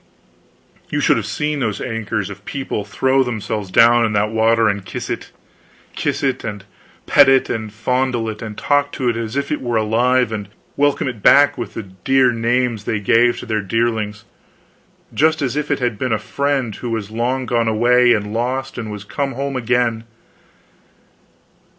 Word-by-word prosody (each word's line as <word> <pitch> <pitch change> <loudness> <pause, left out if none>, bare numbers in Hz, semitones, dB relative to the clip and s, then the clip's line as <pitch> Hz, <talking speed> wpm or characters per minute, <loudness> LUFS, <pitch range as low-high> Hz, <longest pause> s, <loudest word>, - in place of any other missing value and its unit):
You - - -1
should - - +3
have - - -3
seen 150 0 -2
those 110 -6 -2
acres 110 -3 -3
of 100 0 -11
people 135 -4 -4
throw 130 +6 +1
themselves 110 -5 -3
down 120 +4 +5
in 110 -2 0
that 105 +1 +1
water 115 0 +3
and 100 -2 -1
kiss 95 - -6
it; - - -5 0.7
kiss - - -2
it, 130 -2 0
and 105 -2 -5 0.4
pet 140 -2 +6
it, 135 -1 +3
and 110 -2 -4
fondle 125 +1 -1
it, 110 0 -5
and 110 -3 -7
talk 145 0 +1
to 125 -2 -1
it 115 - -1
as 115 +1 -4
if 140 0 -2
it 150 - -1
were 120 -3 -1
alive, 120 +3 +2
and 105 -2 -4 0.3
welcome 145 -1 +1
it 120 -5 -5
back 145 +6 +6
with 120 - -6
the 115 - -4
dear 125 +8 +1
names 115 -1 0
they 110 - -1
gave 120 +4 +2
their 110 -2 0
darlings, 105 0 -2 0.9
just 160 +1 +2
as 135 -3 -1
if 150 0 -2
it 145 - +1
had 120 -5 -2
been 130 - -1
a - - +2
friend 135 -4 -2
who 120 - -5
was 110 -2 -3
long 125 +3 -1
gone 115 -2 0
away 120 +2 +4
and 105 0 -2
lost, 125 +3 -2
and 110 -2 -5
was 105 -1 -7
come 135 +6 -3
home 140 +2 -3
again. 120 -2 0
115 Hz, 180 wpm, -19 LUFS, 110-130 Hz, 0.9 s, pet